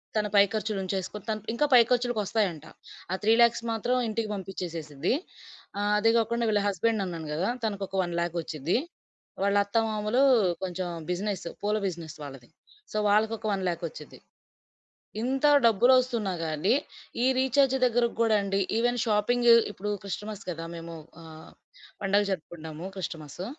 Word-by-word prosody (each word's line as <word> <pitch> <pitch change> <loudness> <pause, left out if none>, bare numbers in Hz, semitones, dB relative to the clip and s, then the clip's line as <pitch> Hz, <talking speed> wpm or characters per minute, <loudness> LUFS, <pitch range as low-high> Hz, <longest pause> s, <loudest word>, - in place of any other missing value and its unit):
తన 210 -1 +1
పై 200 - +8
ఖర్చులుంచేసుకొన 200 -2 -3
తను 215 -1 -2
ఇంకా 295 +6 +2
పై 245 - +9
ఖర్చులకొస్తాయంట. 215 - 0 0.5
ఆ 185 - +1
3,00,000 235 +1 +4
మాత్రం 225 +3 0
ఇంటికి 220 0 -2
పంపిచ్చేసేసిద్ది 170 - -3 0.7
ఆహ్, 205 0 +1
అదే 225 +2 +4
గాకుండా 235 +1 0
వీళ్ళ 210 -1 +2
హస్బెండ్ 205 +3 0
అన్నాను 165 -4 -6
గదా! 170 +7 0 0.2
తనకు 200 -2 -2
ఒక 195 - -8
1,00,000 170 0 -2
ఒచ్చిద్ది. 160 - -1 0.7
వాళ్ళ 200 0 +2
అత్తమామలు 215 +2 0 0.4
కొంచెం 185 0 -3 0.2
బిజినెస్ 195 0 -3 0.2
పూల 210 +1 0
బిజినెస్ 165 -4 -6
వాళ్ళది. 135 -4 -10 0.4
సో - - -3
వాళ్ళకొక 220 +2 +1
1,00,000 180 -3 -2
ఒచ్చిద్ది. - - -12 1.0
ఇంత 265 +4 0 0.2
డబ్బులొస్తున్నా 235 -1 +3
గానీ 155 +6 +1 0.5
ఈ - - +4
రీచార్జ్ 265 +1 +3
దగ్గరకి 240 -1 +2
గూడా 225 -2 +4
అండి 195 0 -1 0.2
ఈవెన్ 245 +1 +1
షాపింగ్ 235 +2 +2 0.2
ఇప్పుడు 210 0 -5
క్రిస్టమస్ 205 +1 -5
గదా! 165 -1 -5
మేము 165 0 -8 0.3
ఆహ్, 160 -1 -12 0.5
పండగ 200 +1 +3
జరుపుకుంటాము, 160 -2 -6
క్రిస్టమస్సు. 160 -1 -6
205 Hz, 130 wpm, -27 LUFS, 175-225 Hz, 1.0 s, పై